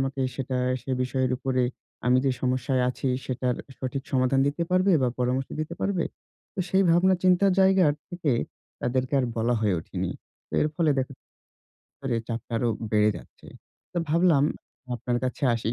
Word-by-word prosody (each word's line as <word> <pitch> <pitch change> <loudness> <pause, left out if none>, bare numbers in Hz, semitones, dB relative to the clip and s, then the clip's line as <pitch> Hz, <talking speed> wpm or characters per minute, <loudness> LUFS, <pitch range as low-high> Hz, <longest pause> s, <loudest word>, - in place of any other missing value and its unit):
আমাকে 135 0 -2
সেটা 130 0 -3 0.3
সে 135 - -6
বিষয়ের 130 0 0
উপরে 130 -1 0 0.4
আমি 125 +1 +5
যে - - +4
সমস্যায় 130 0 +1
আছি, 130 - -3 0.2
সেটার 125 -1 -1 0.2
সঠিক 130 +1 -3
সমাধান 130 +1 +3
দিতে 145 +4 0
পারবে 185 +1 +4
বা 125 - +3
পরামর্শ 125 +2 0
দিতে 155 +2 -4
পারবে? 190 -4 0 0.5
তো - - -14
সেই 190 +2 +3
ভাবনা 180 +3 +5
চিন্তার 185 +1 +5
জায়গার 190 -6 +5 0.2
থেকে 170 -5 0 0.5
তাদেরকে 130 +2 0
আর - - +1
বলা 115 +2 +2
হয়ে 105 -4 +2
ওঠেনি। - - -4 0.4
তো - - -30
এর 150 - +2
ফলে 160 -2 +2
দেখা 130 +1 -1
যা - - -87 0.8
পরে 130 -4 -1
চাপটা 115 0 -5
আরও 120 - +1 0.2
বেড়ে 105 0 +4
যাচ্ছে। - - -14 0.5
তো 175 - -1
ভাবলাম 165 -3 +4 0.5
আপনার 120 +1 -1
কাছে 125 - -3
আসি। 115 0 -2
135 Hz, 170 wpm, -26 LUFS, 125-165 Hz, 0.8 s, আমি